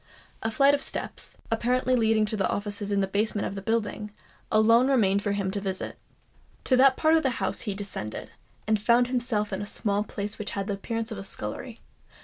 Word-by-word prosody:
A 225 - -1
flight 275 +5 +4
of 285 - +1
steps, - - -4
apparently 250 +3 +2
leading 220 -2 +3
to 210 -3 0
offices 205 0 -3
in 200 -1 +2
the 195 - +1
basement 205 +1 0
of - - -3
the 195 - -5
building, 215 0 -1 0.4
alone 230 +3 +5
remained 200 -7 +3
for 205 -1 -1
him 200 -2 -1
to 200 0 -3
visit. 190 -1 -4 0.7
To 260 - +3
that 265 +1 +5
part 315 0 +4
of 325 - +5
the 265 - +1
house - - 0
he 205 -3 -3
descended, 195 - -5 0.3
and 215 -1 +1
found 235 +3 +4
himself 235 -5 -1
in 190 - -2
a 205 - -5
small 205 -1 -1
place 205 0 -5
which 210 -1 -4
had 200 -1 -2
the 205 - -2
appearance 225 +3 -4
of 215 - -5
a - - -6
scullery. 195 - -5
210 Hz, 205 wpm, -27 LUFS, 200-235 Hz, 0.7 s, alone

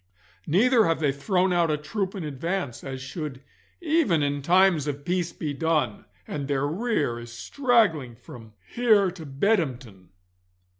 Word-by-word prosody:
Neither 225 - +4
have 165 0 +1
they 150 -3 +2
thrown 180 +7 +1
out 170 -2 +2
a 150 - +1
troop 190 +6 -3
in 190 - -4
advance, 150 -1 -4
as 130 -1 -6
should 140 -2 -6 0.4
even 305 - +2
in 145 0 -1
times 175 -1 +3
of 145 0 -4
peace 175 -1 -1
be 150 -4 -4
done, 150 -7 -1 0.2
and 140 -2 -4
their 140 -1 0
rear 155 - -1
is 120 0 -10
straggling 175 - +1
from 115 -1 -13 0.2
here 215 -6 +4
to 165 -4 -10
Bedhampton. 135 - -1
155 Hz, 150 wpm, -25 LUFS, 135-190 Hz, 0.4 s, Neither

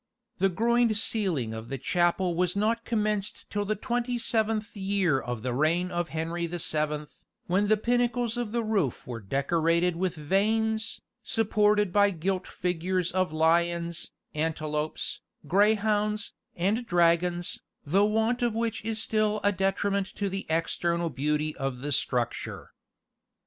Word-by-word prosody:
The 195 - +4
groined 230 +3 +2
ceiling 180 - 0
of 110 +1 -7
the 135 - -3
chapel 175 +5 +1
was 180 +1 +1
not 225 +3 0
commenced 210 -3 -1
till 205 0 -1
the 215 +1 0
twenty 245 +2 -1
seventh 225 -1 0
year 190 -7 +1
of 120 -3 -5
the 125 -1 -1
reign 165 +7 +1
of 175 -1 -2
Henry 165 +2 -2
the 175 +1 -4
Seventh, 150 -2 -2 0.2
when 195 +4 +1
the 215 +1 +4
pinnacles 240 +1 +1
of 240 -3 -3
the 235 0 0
roof 200 - 0
were 120 -2 -5
decorated 165 - +1
with 180 0 -1
vanes, 220 +7 0 0.2
supported 210 -3 +2
by 205 0 +5
gilt 185 +1 -2
figures 180 0 -1
of 185 -2 0
lions, 170 +1 +1 0.2
antelopes, 155 -1 -2 0.3
greyhounds, 210 +3 +2 0.2
and 210 +7 0
dragons, 175 0 +2 0.3
the 190 +8 +3
want 225 +3 +1
of 240 -2 +1
which 230 -1 -1
is 220 0 -1
still 215 -1 +1
a 205 - +4
detriment 195 +1 0
to 200 -1 -1
the 195 +1 -5
external 170 +1 0
beauty 150 +3 -1
of 135 -2 -3
the 145 +1 -3
structure. 125 -3 -1
185 Hz, 145 wpm, -28 LUFS, 165-215 Hz, 0.3 s, by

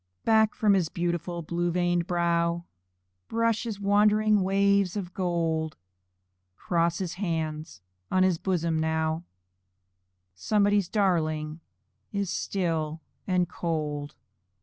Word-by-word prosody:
Back 220 -1 +4
from 210 -2 +3
his 180 -5 +2
beautiful 170 0 -2
blue 175 +2 -1
veined 175 0 +1
brow 170 -1 +1 0.6
Brush 230 0 0
his 215 -4 -4
wandering 210 +1 +3
waves 200 0 +2
of 185 -3 -5
gold; 165 -4 -1 0.8
Cross 170 -1 0
his 180 -3 -3
hands 160 - -3 0.3
on 185 0 +3
his 185 -3 +2
bosom 170 -4 0
now 160 +1 -1 1.1
Somebody's 205 - +2
darling 155 -6 0 0.5
is 200 -3 -2
still 165 -4 -1 0.3
and 180 -2 +2
cold. 150 -4 -3
175 Hz, 105 wpm, -27 LUFS, 160-200 Hz, 1.1 s, Back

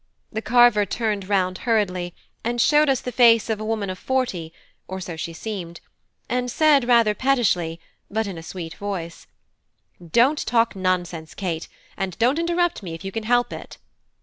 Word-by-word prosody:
The 220 - -3
carver 240 -1 +5
turned 210 -3 -2
round 185 -2 +1
hurriedly 185 -6 0 0.3
and 240 +1 -1
showed 295 +4 +4
us 265 -2 +2
the 250 - -4
face 230 -2 +5
of 215 - -1
a - - -4
woman 215 -2 -2
of 185 - -8
forty 240 -12 -1 0.4
(or 190 0 -5
so 175 -2 -6
she 160 +1 -5
seemed), 170 -2 -6 0.5
and 250 +1 -1
said 285 -1 +4
rather 235 -3 +5
pettishly, 205 -11 +1 0.3
but 220 +2 -1
in 195 -3 -5
a 165 - -7
sweet 165 0 -7
voice: 180 -4 -6 0.8
"Don't 240 - +3
talk 230 -2 +2
nonsense, 175 -4 -2
Kate, 170 -4 -3 0.3
and 190 -3 -3
don't 255 +7 +2
interrupt 345 -1 0
me 170 -4 -6
if 165 - -10
you 195 - -4
can 220 +2 -4
help 245 +1 +2
it." - - -9
210 Hz, 175 wpm, -23 LUFS, 180-240 Hz, 0.8 s, carver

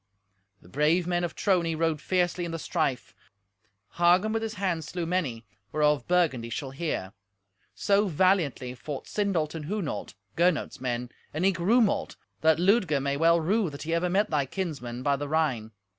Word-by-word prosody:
The - - -17
brave 150 - +2
men 175 0 0
of 170 - -3
Trony 175 -5 +1
rode 160 -2 0
fiercely 180 +2 0
in 170 - -3
the 165 - -3
strife. 155 -6 -2 0.9
Hagen 180 +5 +4
with 225 - 0
his 225 0 -4
hand 185 -5 -1
slew 170 +3 -4
many, 150 -11 -2 0.3
whereof 150 -1 +2
Burgundy 155 -10 +1
shall 130 +3 -4
hear. 135 - -3 0.6
So 200 +1 +2
valiantly 165 -8 +1
fought 140 +2 -7
Sindolt 185 -7 -1
and 160 -3 -6
Hunolt, 160 - -4 0.2
Gernot's 170 -5 +1
men, 125 -1 -3 0.2
and 165 +4 0
eke 190 -3 +2
Rumolt, 215 +4 +2 0.3
that 160 0 +4
Ludger 180 -4 +3
may 140 +1 -1
well 165 +3 +4
rue 195 +4 +1
that 140 0 -8
he 165 +1 -2
ever 170 +2 +1
met 200 +4 +1
thy 145 -3 +1
kinsmen 130 -9 -4
by 140 0 +2
the 145 +1 -4
Rhine. 140 -9 0
165 Hz, 170 wpm, -27 LUFS, 140-185 Hz, 0.9 s, Hagen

